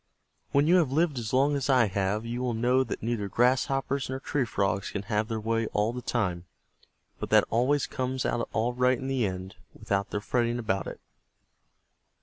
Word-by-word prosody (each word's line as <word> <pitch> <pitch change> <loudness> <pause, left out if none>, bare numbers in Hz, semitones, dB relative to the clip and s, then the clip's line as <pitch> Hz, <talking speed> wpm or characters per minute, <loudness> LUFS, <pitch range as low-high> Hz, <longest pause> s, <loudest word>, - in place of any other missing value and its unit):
When 140 +1 +3
you 175 +4 +5
have 160 -7 +2
lived 155 -2 +1
as 110 -2 -4
long 140 +3 +3
as 140 -1 -2
I 130 -3 +5
have, 100 +2 -1
you 120 +2 -3
will 125 -2 -1
know 125 +3 +3
that 115 - -6
neither 115 -3 -1
Grasshoppers 135 +4 +1
nor 130 0 -3
Tree 140 -1 -1
Frogs 100 -3 -1
can 100 - -4
have 105 +1 -1
their 110 -1 -3
way 115 +1 0
all 105 +3 +1
the 125 - -5
time, 90 -9 -1 0.7
but - - -4
that - - +6
it - - -9
always 125 +5 +2
comes 130 0 -3
out 120 - -1
all 115 +2 0
right 125 +1 +2
in 130 - -7
the 130 -5 +1
end 95 0 -6 0.2
without 100 0 -2
their 105 - -2
fretting 120 +2 0
about 100 -5 -1
it." - - -7
120 Hz, 200 wpm, -28 LUFS, 105-130 Hz, 0.7 s, that